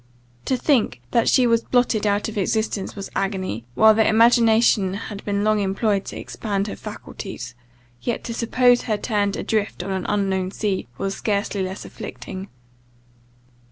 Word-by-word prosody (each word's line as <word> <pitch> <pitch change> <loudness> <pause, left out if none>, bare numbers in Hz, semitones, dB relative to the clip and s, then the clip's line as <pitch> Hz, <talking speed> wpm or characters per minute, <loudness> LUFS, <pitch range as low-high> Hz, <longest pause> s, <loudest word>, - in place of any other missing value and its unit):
To 260 - +1
think 240 - +1
that 235 - +3
she 255 - +4
was 230 -1 +3
blotted 240 -4 +1
out 205 0 +1
of 220 - -6
existence 210 0 -1
was 200 -1 -7
agony, 185 - -2
when 220 0 +6
the 220 - +4
imagination 225 -3 +4
had 205 -1 -7
been 205 0 0
long 215 0 +3
employed 200 +1 0
to - - -7
expand 200 -3 -3
her - - -5
faculties; 190 - -8 0.5
yet 240 - -2
to 230 - -4
suppose 245 +1 +3
her 215 -3 -1
turned 205 -2 0
adrift 215 -4 -1
on 195 - -4
an 190 -1 -2
unknown 195 -2 0
sea, 195 - -2
was 195 0 -2
scarcely 200 -1 -1
less 190 +1 -4
afflicting. 190 +1 -8
205 Hz, 160 wpm, -22 LUFS, 195-225 Hz, 0.5 s, when